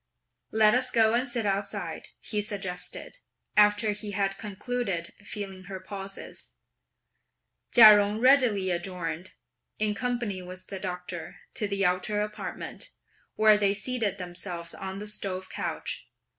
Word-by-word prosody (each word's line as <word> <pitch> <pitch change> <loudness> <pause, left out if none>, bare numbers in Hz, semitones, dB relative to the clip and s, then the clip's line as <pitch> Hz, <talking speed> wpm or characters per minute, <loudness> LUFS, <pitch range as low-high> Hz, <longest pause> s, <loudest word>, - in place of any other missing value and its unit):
"Let 215 -1 +5
us 255 +1 +3
go 225 -2 +4
and 245 +3 +2
sit 240 -3 -2
outside," 200 0 -2
he 210 -2 -1
suggested, 195 - -4 0.4
after 210 +1 +5
he 210 0 -5
had 195 0 0
concluded 205 -4 -3
feeling 195 -2 -6
her 190 0 -6
pulses. 195 +1 -7 1.2
Chia 215 -3 +11
Jung 205 +1 +1
readily 240 -7 +4
adjourned, 175 -1 -3 0.4
in 215 -1 +1
company 235 -4 -2
with 185 +1 -9
the 195 - -5
Doctor, 180 -2 -6
to 210 - -2
the 200 0 +1
outer 185 +4 +1
apartment, 210 - -5 0.5
where 215 -1 +6
they 200 -1 +2
seated 210 -2 -1
themselves 175 -1 -6
on 190 0 -6
the 205 - -6
stove 190 -3 -4
couch. - - -4
200 Hz, 130 wpm, -28 LUFS, 185-215 Hz, 1.2 s, Chia